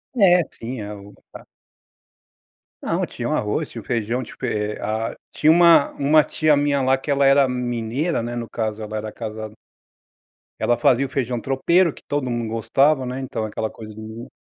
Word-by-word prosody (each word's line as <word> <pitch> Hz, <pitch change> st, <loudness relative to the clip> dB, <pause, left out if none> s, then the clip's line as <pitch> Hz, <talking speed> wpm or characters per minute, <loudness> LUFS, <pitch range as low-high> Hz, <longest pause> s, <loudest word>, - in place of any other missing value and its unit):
É 180 Hz, -6 st, +5 dB
sim 120 Hz, +1 st, -7 dB
a 105 Hz, 0 st, -6 dB
o 100 Hz, 0 st, -13 dB, 0.2 s
a -, -, -10 dB, 1.4 s
Não, -, -, -1 dB
tinha -, -, -5 dB
o -, -, -2 dB
arroz, -, -, -1 dB
tinha -, -, -7 dB
o -, -, -18 dB
feijão 120 Hz, +2 st, -1 dB
tipo, 120 Hz, -, -7 dB
é 105 Hz, 0 st, -2 dB
a 110 Hz, +1 st, -3 dB
tinha 155 Hz, -, +4 dB
uma 170 Hz, -3 st, +6 dB
uma 150 Hz, +2 st, +4 dB
tia 155 Hz, 0 st, +2 dB
minha 145 Hz, 0 st, +1 dB
lá 130 Hz, 0 st, +3 dB
que 135 Hz, +3 st, -8 dB
ela 140 Hz, -1 st, +3 dB
era 135 Hz, -1 st, +5 dB
mineira, 125 Hz, +5 st, -2 dB
né, 120 Hz, +1 st, -4 dB
no 120 Hz, -1 st, -4 dB
caso 110 Hz, -2 st, -3 dB
ela 105 Hz, 0 st, -6 dB
era 110 Hz, 0 st, -5 dB
casada 110 Hz, 0 st, -7 dB, 1.0 s
ela 120 Hz, -, +2 dB
fazia 125 Hz, +3 st, +3 dB
o -, -, -7 dB
feijão 125 Hz, -2 st, -2 dB
tropeiro 160 Hz, +7 st, +2 dB
que -, -, -16 dB
todo 145 Hz, -3 st, -1 dB
mundo 120 Hz, -2 st, -2 dB
gostava, 135 Hz, +5 st, +2 dB
né, 125 Hz, +1 st, -4 dB
então 130 Hz, -4 st, -4 dB
aquela 110 Hz, +1 st, -3 dB
coisa 110 Hz, -1 st, -11 dB
de 110 Hz, -, -10 dB
Minas, 110 Hz, +3 st, -8 dB
125 Hz, 190 wpm, -22 LUFS, 110-140 Hz, 1.4 s, uma